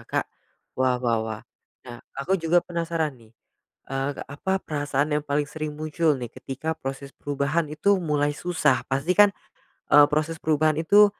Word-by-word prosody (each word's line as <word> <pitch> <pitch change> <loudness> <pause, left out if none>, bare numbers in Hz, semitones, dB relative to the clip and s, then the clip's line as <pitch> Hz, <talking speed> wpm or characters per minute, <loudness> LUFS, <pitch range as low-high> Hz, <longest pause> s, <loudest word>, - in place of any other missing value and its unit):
Kak? - - 0 0.5
Wah 130 -1 +2
wah 120 -2 +1
wah. 110 -1 -4 0.4
Nah 120 -1 -9 0.2
aku 180 +7 0
juga 165 +1 +3
penasaran 165 -3 -2
nih, 110 0 -20 0.6
eee, 135 +1 -1
apa 190 +7 -2
perasaan 145 0 -1
yang 150 - 0
paling 145 +1 +1
sering 155 -1 -4
muncul 155 0 +1
nih 125 -2 -5
ketika 140 +5 -4
proses 135 +1 -6
perubahan 145 +3 -1
itu 195 +6 +2
mulai 145 -3 +1
susah? 160 -6 +1
Pasti 135 +6 +1
kan, 205 0 +8 0.7
eee, 145 0 +9
proses 155 +2 0
perubahan 155 0 +2
itu, 205 +6 +7
150 Hz, 155 wpm, -25 LUFS, 135-165 Hz, 0.7 s, eee